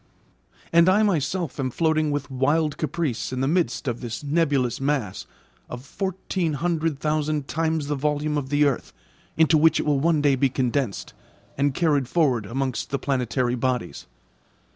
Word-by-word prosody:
And 170 +2 +6
I 205 +3 +4
myself 170 -4 -1
am 130 -1 0
floating 155 +2 +1
with 145 -1 -3
wild 145 +4 +1
caprice 155 -7 -2
in 130 0 -3
the 135 - +1
midst 150 -6 0
of 120 -1 -2
this 120 +2 -5
nebulous 140 -5 +1
mass 135 -9 -2 0.4
of 125 +2 -8
fourteen 190 -1 -3
hundred 160 0 -1
thousand 150 -1 -1
times 160 -1 -1
the 145 - -2
volume 150 +1 -1
of 140 -3 -2
the 145 +1 +3
earth 140 -4 -1 0.4
into 160 -1 +4
which 160 0 +4
it - - -2
will 145 -2 +2
one 160 +1 +2
day 145 -2 +3
be 135 +1 +2
condensed, 125 -3 -2 0.4
and 140 0 0
carried 145 -6 +1
forward 130 - +1
amongst 130 +2 -2
the 140 - -1
planetary 125 -3 -1
bodies. 125 - -2
145 Hz, 165 wpm, -24 LUFS, 130-160 Hz, 0.4 s, And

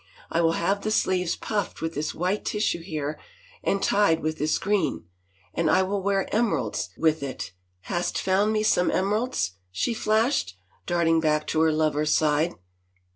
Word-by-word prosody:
" - - -24
I 170 - +2
will 165 -1 +3
have 195 +5 0
the 215 - -2
sleeves 185 -4 +1
puffed 205 -4 -3
with 160 0 -3
this 150 0 -3
white 185 +4 -1
tissue 210 -5 -1
here 155 -3 -4 0.4
and 195 0 0
tied 200 -6 +3
with 155 +1 -2
this 155 +1 +1
green, 205 - 0 0.5
and 165 -2 +1
I 190 - +4
will 195 +1 -1
wear 195 0 +1
emeralds 200 - 0
with 160 -1 +2
it 135 -6 -5 0.2
— 90 - -45
hast 175 - -2
found 195 +3 +2
me 215 -1 +1
some 180 -4 +3
emeralds?" 200 - 0 0.2
she 95 - -1
flashed, 220 - +1 0.3
dart 175 -1 +1
ing 165 0 +4
back 155 -1 +1
to 155 - +1
her 160 0 +4
lover's 155 -1 +1
side. 155 +2 +2
170 Hz, 180 wpm, -25 LUFS, 155-200 Hz, 0.5 s, I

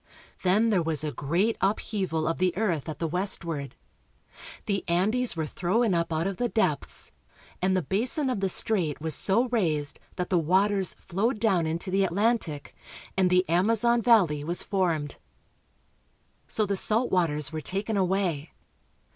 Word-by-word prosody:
Then 210 +5 +3
there 190 -4 +3
was 160 -3 -1
a 150 - -2
great 170 +12 0
upheaval 190 -5 -1
of 165 - -1
the 185 -1 +1
earth 175 -8 -1
at 155 - -5
the 165 - -2
westward. 165 -5 -2 0.9
The 195 -2 -1
Andes 215 +8 +1
were 160 -1 -2
thrown 190 +7 0
up 170 0 0
out 160 +1 0
of 195 -1 -2
the 245 -1 0
depths, 155 -12 -1 0.5
and 185 +1 +2
the 185 - 0
basin 245 - 0
of 250 -5 -1
the 195 -1 0
strait 180 -7 0
was 160 0 -2
so 225 - +1
raised 160 - 0 0.2
that 180 +1 -4
the 180 - +4
waters 190 +4 +1
flowed 210 +6 -2
down 190 -7 +2
into 170 +4 -3
the 195 +1 +2
Atlantic, 190 -6 -1 0.4
and 185 -1 +3
the 180 +1 +3
Amazon 225 +7 +2
valley 190 -12 +4
was 170 +3 -1
formed. 170 -7 -1 1.3
So 215 - 0
the 200 0 -1
salt 225 +5 +1
waters 150 -5 +1
were 155 - -3
taken 200 +8 -3
away. 185 -5 0
185 Hz, 160 wpm, -27 LUFS, 165-210 Hz, 1.3 s, the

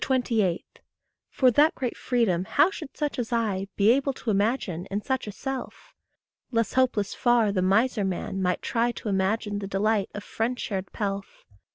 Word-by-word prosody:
For, 255 -2 +3
that 300 +7 +4
great 250 -3 -3
freedom 210 -8 0
how 295 - +3
should 310 -7 -9
such 295 -3 -2
as 240 -1 -3
I 210 -5 0
Be 205 +2 +5
able 275 +2 +2
to 240 -3 -3
imagine 200 -4 0
in 200 +2 -3
such 260 -4 -2
a - - -4
self? 270 +5 -6 0.6
Less 230 -3 0
hopeless 245 -6 +1
far 240 -4 +3
the 190 -2 0
miser 210 +4 +2
man 190 0 -3
might 180 -1 0
try 235 0 +1
To 220 - -5
image 195 +3 +1
the 205 -1 -4
delight 200 +1 +1
of 205 - -5
friend 235 +2 -2
shared 195 -2 -4
pelf. 200 -2 -4
220 Hz, 170 wpm, -26 LUFS, 195-250 Hz, 0.6 s, Be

